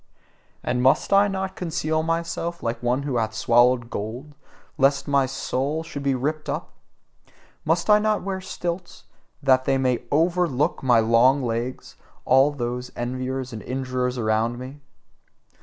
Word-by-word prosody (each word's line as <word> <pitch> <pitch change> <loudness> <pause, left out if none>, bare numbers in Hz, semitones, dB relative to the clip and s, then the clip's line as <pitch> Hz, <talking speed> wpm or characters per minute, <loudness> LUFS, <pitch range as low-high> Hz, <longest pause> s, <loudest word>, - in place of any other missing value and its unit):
And 125 0 0
MUST 130 +8 +3
I 200 +1 +6
not 190 -1 -3
conceal 160 -2 -1
myself 170 +1 -3
like 115 0 -2
one 125 +3 0
who 140 -4 -2
hath 110 -1 -1
swallowed 120 +1 +3
gold 120 +8 -5 0.5
lest 140 0 +3
my 140 -2 +2
soul 135 +3 -2
should 165 -3 -7
be 140 -1 +1
ripped 150 +4 -3
up? - - -4 0.9
MUST 165 +2 +1
I 210 0 +6
not 215 0 0
wear 190 -1 -3
stilts, 175 -1 -5 0.4
that 130 -1 +4
they 135 - +2
may 130 -2 +1
OVERLOOK 165 -1 +1
my 125 -3 +4
long 120 +5 +4
legs 120 +2 -4 0.3
all 135 +2 +5
those 125 -2 -4
enviers 130 +1 -4
and 110 - -6
injurers 130 -1 -2
around 110 +1 0
me? 130 +3 -9
135 Hz, 145 wpm, -24 LUFS, 125-160 Hz, 0.9 s, I